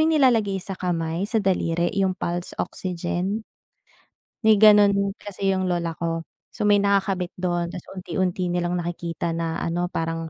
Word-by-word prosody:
yung 320 +1 +3
nilalagay 225 -8 +3
sa 190 +1 -5
kamay, 175 0 -2
sa 220 -4 0
daliri, 170 -2 +1
yung 190 -2 +1
pulse 175 0 -3
oxygen? 185 +4 -2 1.0
May 215 -2 +5
gano'n 210 -2 +7 0.2
kasi 195 -1 -3
yung 190 -1 +1
lola 170 -3 -1
ko. 165 -1 -2 0.3
So, 210 - 0
may 205 - +6
nakakabit 195 -2 +1
do'n, 175 -1 -2
tapos 175 - -8
unti-unti 180 -1 -1
nilang 175 0 0
nakikita 170 -1 -3
na 165 0 -2
ano 175 +1 -1
parang, 165 -1 -3
180 Hz, 150 wpm, -24 LUFS, 170-200 Hz, 1.0 s, gano'n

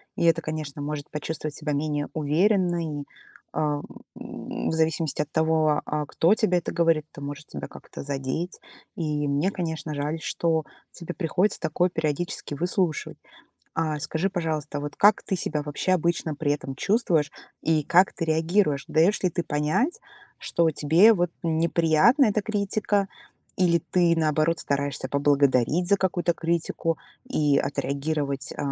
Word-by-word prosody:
И - - -1
это, 165 0 +4
конечно, 155 -2 -5
может 145 0 -4
почувствовать 155 0 -4
себя 150 -1 -3
менее 145 0 -1
уверенной, 165 -1 +1 0.5
а, 150 -1 0
в - - -16 0.9
в - - 0
зависимости 160 -2 0
от 150 0 -5
того, 160 -1 +2
а, 150 0 -2
кто 170 +7 +3
тебе 185 -5 +2
это - - -5
говорит, 165 -3 +2
это - - -11
может 145 +2 -7
тебя - - -6
как-то - - -10
задеть. 140 +5 -3 0.4
И 150 -3 -1
мне, 145 +7 +1
конечно, 160 -4 -4
жаль, 150 +3 -2
что 160 -1 0 0.3
тебе 175 0 -7
приходится 180 +4 0
такое 175 +4 +1
периодически 160 -1 -2
выслушивать. 175 0 -1 0.6
А, 155 -2 -1
скажи, 160 +6 -1
пожалуйста, 155 -5 -2
вот 145 0 -5
как 205 +1 +5
ты 190 - -1
себя 150 -4 -2
вообще 150 +5 0
обычно 170 -2 0
при 145 0 0
этом 135 -2 -6
чувствуешь 175 - +1 0.3
и 155 -1 +2
как 180 +5 +4
ты 165 - -3
реагируешь? 160 -2 +1
Даешь 165 +7 +3
ли 185 - +3
ты 175 - -1
понять, 155 - 0 0.4
что 170 -1 +1
тебе, 165 +10 +5
вот, 175 -4 0
неприятна 165 - +3
эта 215 -1 +1
критика, 205 -1 0 0.5
или 170 -3 +3
ты, 175 -2 +4
наоборот, 155 +1 +2
стараешься 140 -2 -2
поблагодарить 140 +3 +2
за 200 - +5
какую-то 180 -2 0
критику 165 -1 -1 0.3
и 150 - +2
отреагировать, 140 0 -2
э, - - -16
160 Hz, 150 wpm, -25 LUFS, 150-175 Hz, 0.9 s, как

